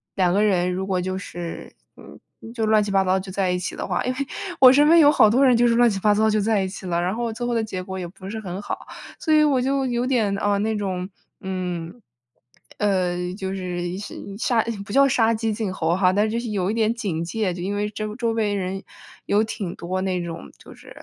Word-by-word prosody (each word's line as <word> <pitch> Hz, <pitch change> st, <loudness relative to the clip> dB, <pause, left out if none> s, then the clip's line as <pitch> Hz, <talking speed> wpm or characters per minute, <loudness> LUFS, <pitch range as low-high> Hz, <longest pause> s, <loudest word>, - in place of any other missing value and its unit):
两 180 Hz, -2 st, +2 dB
个 205 Hz, +2 st, +3 dB
人 180 Hz, -3 st, +2 dB
如 190 Hz, +1 st, -3 dB
果 185 Hz, -2 st, 0 dB
就 185 Hz, +1 st, -3 dB
是， 175 Hz, -3 st, -7 dB, 0.3 s
嗯， -, -, -14 dB, 0.3 s
就 230 Hz, -2 st, -2 dB
乱 215 Hz, -1 st, +4 dB
七 205 Hz, -, -4 dB
八 195 Hz, -1 st, +3 dB
糟 190 Hz, 0 st, +2 dB
就 190 Hz, 0 st, -8 dB
在 190 Hz, -1 st, 0 dB
一 180 Hz, -, -1 dB
起 180 Hz, -, -4 dB
的 -, -, -4 dB
话， -, -, -1 dB
因 255 Hz, -, 0 dB
为 255 Hz, -, -7 dB, 0.4 s
我 255 Hz, -1 st, +9 dB
身 295 Hz, +2 st, +5 dB
边 335 Hz, +2 st, +6 dB
有 295 Hz, -2 st, +7 dB
好 215 Hz, -, +5 dB
多 255 Hz, +6 st, +4 dB
人 255 Hz, -2 st, +5 dB
就 240 Hz, +1 st, +4 dB
是 230 Hz, -, +3 dB
乱 240 Hz, 0 st, +5 dB
七 200 Hz, -3 st, 0 dB
八 210 Hz, +1 st, +3 dB
糟 220 Hz, +1 st, +3 dB
就 215 Hz, 0 st, +1 dB
在 210 Hz, -1 st, +1 dB
一 190 Hz, -, -2 dB
起 185 Hz, 0 st, -8 dB
了， 170 Hz, -1 st, 0 dB
然 180 Hz, +2 st, 0 dB
后 235 Hz, 0 st, -2 dB
最 225 Hz, +2 st, -4 dB
后 240 Hz, -, -1 dB
的 230 Hz, -1 st, +1 dB
结 185 Hz, -4 st, -5 dB
果 190 Hz, 0 st, -6 dB
也 175 Hz, -, -4 dB
不 190 Hz, +2 st, -12 dB
是 220 Hz, +3 st, -5 dB
很 190 Hz, -2 st, -6 dB
好， 205 Hz, -, -6 dB, 0.3 s
所 315 Hz, -, -1 dB
以 305 Hz, 0 st, +6 dB
我 275 Hz, -4 st, +3 dB
就 270 Hz, +1 st, 0 dB
有 245 Hz, 0 st, -1 dB
点， 220 Hz, -7 st, +1 dB
啊， 205 Hz, 0 st, +1 dB
那 220 Hz, +1 st, 0 dB
种， 185 Hz, -2 st, -3 dB, 0.3 s
嗯， 180 Hz, +1 st, -5 dB, 0.8 s
呃， 180 Hz, -3 st, 0 dB
就 190 Hz, -2 st, -4 dB
是 180 Hz, -1 st, -4 dB
是 205 Hz, -, -7 dB, 0.2 s
杀 235 Hz, 0 st, +1 dB
呃 230 Hz, +1 st, 0 dB
不 205 Hz, -, -7 dB
叫 275 Hz, +1 st, +6 dB
杀 230 Hz, -2 st, +3 dB
鸡 220 Hz, 0 st, -1 dB
儆 210 Hz, -1 st, -2 dB
猴 165 Hz, -2 st, 0 dB
哈， 185 Hz, -1 st, +3 dB
但 205 Hz, +2 st, +3 dB
是 215 Hz, -, -2 dB
就 230 Hz, -, -1 dB
是 235 Hz, -1 st, -5 dB
有 195 Hz, -1 st, 0 dB
一 -, -, -2 dB
点 225 Hz, 0 st, +1 dB
警 195 Hz, -9 st, -3 dB
戒。 200 Hz, 0 st, -1 dB
就 175 Hz, -, -7 dB
因 200 Hz, +3 st, -2 dB
为 205 Hz, +1 st, -1 dB
这 215 Hz, 0 st, -5 dB
周 235 Hz, -1 st, -1 dB
围 220 Hz, -2 st, 0 dB
人 190 Hz, 0 st, -3 dB, 0.4 s
有 210 Hz, +2 st, +2 dB
挺 200 Hz, -5 st, -5 dB
多 185 Hz, +2 st, -3 dB
那 185 Hz, -2 st, -1 dB
种 165 Hz, -1 st, -7 dB
就 -, -, -14 dB
是， -, -, -16 dB
205 Hz, 275 characters per minute, -23 LUFS, 185-225 Hz, 0.8 s, 我